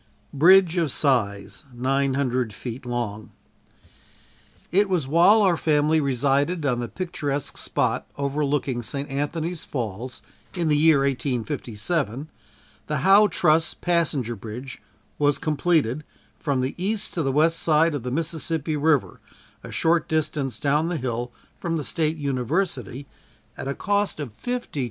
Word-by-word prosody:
Bridge 180 Hz, +4 st, +6 dB
of 165 Hz, -5 st, +1 dB
Size 115 Hz, -6 st, 0 dB
(900 130 Hz, -2 st, 0 dB
feet 125 Hz, +3 st, -7 dB
long.) 115 Hz, -3 st, -3 dB, 1.4 s
It 200 Hz, +3 st, +3 dB
was 175 Hz, -7 st, +1 dB
while 175 Hz, +9 st, +5 dB
our 185 Hz, -3 st, +4 dB
family 155 Hz, 0 st, +2 dB
resided 140 Hz, +4 st, +1 dB
on 125 Hz, -3 st, +1 dB
the 120 Hz, -, -3 dB
picturesque 145 Hz, -6 st, -3 dB
spot -, -, -1 dB
overlooking 140 Hz, -2 st, -1 dB
St. 140 Hz, +4 st, -4 dB
Anthony's 155 Hz, +4 st, -2 dB
Falls 120 Hz, 0 st, -5 dB, 0.3 s
in 170 Hz, -3 st, 0 dB
the 150 Hz, -, +4 dB
year 150 Hz, -1 st, +5 dB
1857, 135 Hz, +1 st, -2 dB, 0.6 s
the 150 Hz, -, -1 dB
"Howe 200 Hz, +2 st, +7 dB
Truss" 160 Hz, -3 st, +2 dB
passenger 155 Hz, -9 st, 0 dB
bridge 115 Hz, +5 st, -8 dB, 0.4 s
was 145 Hz, -1 st, +3 dB
completed 155 Hz, -3 st, +1 dB, 0.4 s
from 140 Hz, -4 st, 0 dB
the 130 Hz, +2 st, -2 dB
east 210 Hz, +1 st, -1 dB
to 170 Hz, -, -1 dB
the 135 Hz, -3 st, 0 dB
west 160 Hz, +4 st, +3 dB
side 160 Hz, +1 st, +3 dB
of 145 Hz, -, -3 dB
the 125 Hz, -, -4 dB
Mississippi 160 Hz, +1 st, -2 dB
river, 150 Hz, -2 st, +1 dB, 0.4 s
a -, -, -9 dB
short 165 Hz, 0 st, +1 dB
distance 150 Hz, -4 st, -1 dB
down 150 Hz, +3 st, +1 dB
the 175 Hz, -, -1 dB
hill 120 Hz, -2 st, -3 dB, 0.3 s
from 165 Hz, -1 st, -2 dB
the 150 Hz, -, -3 dB
State 160 Hz, +2 st, 0 dB
University 140 Hz, -, -2 dB, 0.5 s
at -, -, -6 dB
a 140 Hz, -, -2 dB
cost 205 Hz, -3 st, 0 dB
of 145 Hz, -4 st, -4 dB
$52,000. 245 Hz, -, -4 dB
145 Hz, 135 wpm, -24 LUFS, 130-165 Hz, 1.4 s, Howe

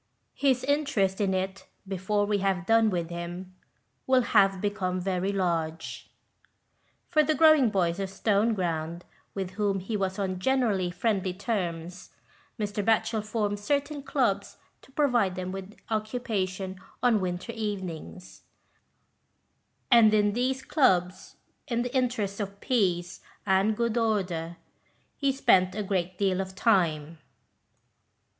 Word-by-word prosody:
His 265 Hz, -3 st, +1 dB
interest 260 Hz, -9 st, +1 dB
in 190 Hz, -2 st, +1 dB
it, 190 Hz, +1 st, -3 dB, 0.2 s
before 195 Hz, +2 st, 0 dB
we 205 Hz, 0 st, 0 dB
have 190 Hz, -3 st, 0 dB
done 225 Hz, +1 st, +4 dB
with 175 Hz, -3 st, -2 dB
him, 175 Hz, +2 st, -6 dB, 0.5 s
will 260 Hz, -1 st, +4 dB
have 195 Hz, -4 st, +3 dB
become 190 Hz, -2 st, -1 dB
very 185 Hz, +1 st, -1 dB
large. 165 Hz, -4 st, -2 dB, 1.0 s
For 310 Hz, -3 st, +3 dB
the 310 Hz, +1 st, +1 dB
growing 310 Hz, -6 st, +6 dB
boys 180 Hz, -3 st, 0 dB
of 195 Hz, -1 st, -2 dB
Stoneground, 185 Hz, -5 st, 0 dB, 0.3 s
with 190 Hz, -2 st, -3 dB
whom 200 Hz, 0 st, 0 dB
he 195 Hz, +4 st, -4 dB
was 190 Hz, -2 st, -1 dB
on 190 Hz, -2 st, -2 dB
generally 215 Hz, -6 st, +1 dB
friendly 190 Hz, -1 st, -1 dB
terms, 180 Hz, -4 st, -4 dB, 0.5 s
Mr. 205 Hz, -1 st, -2 dB
Batchel 225 Hz, 0 st, +1 dB
formed 210 Hz, -1 st, -2 dB
certain 285 Hz, +6 st, -1 dB
clubs 215 Hz, -8 st, -1 dB, 0.2 s
to -, -, -20 dB
provide 245 Hz, -10 st, +2 dB
them 185 Hz, 0 st, -4 dB
with 195 Hz, +2 st, -8 dB
occupation 205 Hz, -4 st, -2 dB, 0.2 s
on 235 Hz, -4 st, +4 dB
winter 185 Hz, +3 st, -3 dB
evenings; 190 Hz, -5 st, -6 dB, 1.5 s
and 230 Hz, -3 st, +7 dB
in 205 Hz, -1 st, +3 dB
these 260 Hz, +3 st, -1 dB
clubs, 185 Hz, -, +1 dB, 0.3 s
in 240 Hz, -1 st, 0 dB
the 245 Hz, +2 st, -5 dB
interests 230 Hz, -6 st, 0 dB
of 200 Hz, -1 st, -5 dB
peace 180 Hz, -9 st, 0 dB, 0.3 s
and 200 Hz, +2 st, +2 dB
good 235 Hz, -1 st, 0 dB
order, 180 Hz, -7 st, -1 dB, 0.6 s
he 275 Hz, -1 st, +1 dB
spent 190 Hz, -9 st, +3 dB
a 210 Hz, -, -2 dB
great 185 Hz, -2 st, -2 dB
deal 195 Hz, -2 st, +1 dB
of 190 Hz, 0 st, -7 dB
time. 165 Hz, -8 st, +1 dB
200 Hz, 130 wpm, -27 LUFS, 185-225 Hz, 1.5 s, and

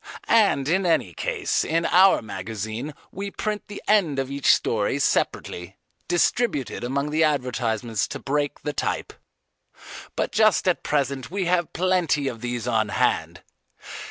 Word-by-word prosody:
And 200 Hz, -12 st, +3 dB
in 185 Hz, +5 st, +2 dB
any 160 Hz, -, +1 dB
case -, -, -1 dB
in 165 Hz, +1 st, 0 dB
our 190 Hz, -4 st, +5 dB
magazine 110 Hz, +7 st, -5 dB, 0.2 s
we 200 Hz, +2 st, -5 dB
print 210 Hz, +1 st, -4 dB
the 205 Hz, -, -9 dB
end 185 Hz, -10 st, +3 dB
of 135 Hz, 0 st, -2 dB
each 140 Hz, -1 st, +3 dB
story 110 Hz, +4 st, +1 dB
separately, 95 Hz, -8 st, -1 dB, 0.3 s
distributed 175 Hz, -, 0 dB
among 140 Hz, +4 st, -1 dB
the 160 Hz, +1 st, +2 dB
advertisements 120 Hz, -7 st, 0 dB
to -, -, -6 dB
break 145 Hz, +1 st, -2 dB
the 150 Hz, -, -2 dB
type. -, -, -2 dB, 1.0 s
But -, -, -1 dB
just 215 Hz, -3 st, +3 dB
at 180 Hz, -, +2 dB
present 140 Hz, -3 st, -1 dB
we 190 Hz, +1 st, -2 dB
have 175 Hz, -1 st, +1 dB
plenty 175 Hz, -5 st, +1 dB
of 120 Hz, -4 st, -5 dB
these 120 Hz, -1 st, -3 dB
on 110 Hz, -3 st, +1 dB
hand. -, -, 0 dB
145 Hz, 145 wpm, -24 LUFS, 120-180 Hz, 1.0 s, our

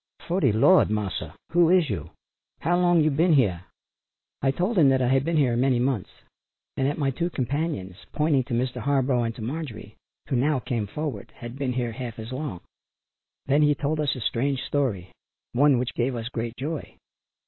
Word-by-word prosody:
"Fo' 175 Hz, +3 st, 0 dB
de 135 Hz, -, +3 dB
Lard, 115 Hz, -, +5 dB
Marsa; 105 Hz, -3 st, -3 dB, 0.2 s
Who 170 Hz, -1 st, +4 dB
is 180 Hz, -3 st, +4 dB
yo', 85 Hz, -7 st, -4 dB, 0.5 s
how 175 Hz, -, +2 dB
long 175 Hz, -2 st, +4 dB
yo' 155 Hz, 0 st, +3 dB
ben 165 Hz, +4 st, +3 dB
heah?" 95 Hz, -, +2 dB, 0.7 s
I 135 Hz, -, +2 dB
told 180 Hz, -, 0 dB
him 145 Hz, -4 st, +6 dB
that 135 Hz, 0 st, +3 dB
I 125 Hz, -1 st, +1 dB
had 135 Hz, 0 st, +3 dB
been 165 Hz, +1 st, 0 dB
here 130 Hz, -5 st, +3 dB
many 130 Hz, +1 st, +2 dB
months, 125 Hz, -5 st, 0 dB, 0.7 s
and 135 Hz, -, +1 dB
that 145 Hz, -, -1 dB
my 140 Hz, -3 st, +1 dB
two 170 Hz, +6 st, -2 dB
companions, 135 Hz, -, -3 dB
pointing 150 Hz, -3 st, +2 dB
to 125 Hz, -, -2 dB
Mr. 125 Hz, +2 st, -1 dB
Harborough 130 Hz, -1 st, +1 dB
and 115 Hz, 0 st, -3 dB
to 115 Hz, -, -7 dB
Marjorie, 120 Hz, -5 st, -6 dB, 0.3 s
who 135 Hz, -, -1 dB
now 140 Hz, +4 st, +2 dB
came 120 Hz, -4 st, -2 dB
forward, 150 Hz, +6 st, -5 dB
had 120 Hz, +1 st, -8 dB
been 135 Hz, -2 st, -2 dB
here 120 Hz, -2 st, -1 dB
half 120 Hz, -1 st, -6 dB
as 110 Hz, +2 st, -7 dB
long. 130 Hz, -, -5 dB, 0.8 s
Then 140 Hz, +3 st, +3 dB
he 150 Hz, -1 st, +4 dB
told 150 Hz, +2 st, -1 dB
us 150 Hz, -2 st, 0 dB
a 130 Hz, -, -7 dB
strange 130 Hz, +4 st, 0 dB
story, 110 Hz, -11 st, -1 dB, 0.4 s
one 140 Hz, +2 st, +4 dB
which 125 Hz, 0 st, -2 dB
gave 125 Hz, +1 st, -1 dB
us 115 Hz, 0 st, -4 dB
great 115 Hz, -1 st, -4 dB
joy. 150 Hz, +3 st, -5 dB
135 Hz, 195 wpm, -25 LUFS, 120-150 Hz, 0.8 s, him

